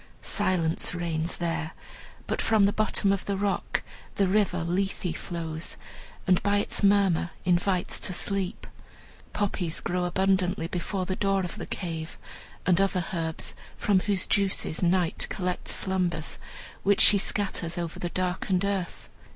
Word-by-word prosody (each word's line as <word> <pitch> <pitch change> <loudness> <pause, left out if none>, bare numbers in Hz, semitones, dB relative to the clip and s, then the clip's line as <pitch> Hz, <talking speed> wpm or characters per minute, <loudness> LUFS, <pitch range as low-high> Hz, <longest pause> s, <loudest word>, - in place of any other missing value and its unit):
Silence 170 -1 +1
reigns 170 -1 -1
there; 165 -2 -2 0.5
but - - -1
from 220 -3 +4
the 200 - +2
bottom 215 -2 +3
of 195 - -3
the 200 -1 -1
rock 200 0 -1 0.3
the 195 - +3
River 190 -3 +2
Lethe 180 -1 -1
flows, 165 -2 -5 0.5
and 185 -2 +4
by 205 +1 +2
its 205 - 0
murmur 195 -4 +4 0.2
invites 180 +1 +2
to - - -3
sleep. 195 0 -1 0.7
Poppies 185 -5 -1
grow 180 0 -1
abundantly 185 -1 +1
before 185 +2 -2
the 185 - -2
door 195 -1 +1
of 180 -2 -5
the - - -6
cave, 165 -3 -5 0.5
and 180 +1 +4
other 185 -3 +1
herbs, 160 -2 -2 0.2
from 200 -2 +3
whose 195 -1 +1
juices 195 -5 +1
Night 175 -1 +2
collects 180 -1 -2
slumbers, 180 -4 -1 0.4
which 200 0 +3
she 205 - +8
scatters 185 -4 -1
over 170 -2 -4
the 175 - -2
darkened 185 +1 0
earth. 195 -3 -3
185 Hz, 145 wpm, -27 LUFS, 170-195 Hz, 0.7 s, she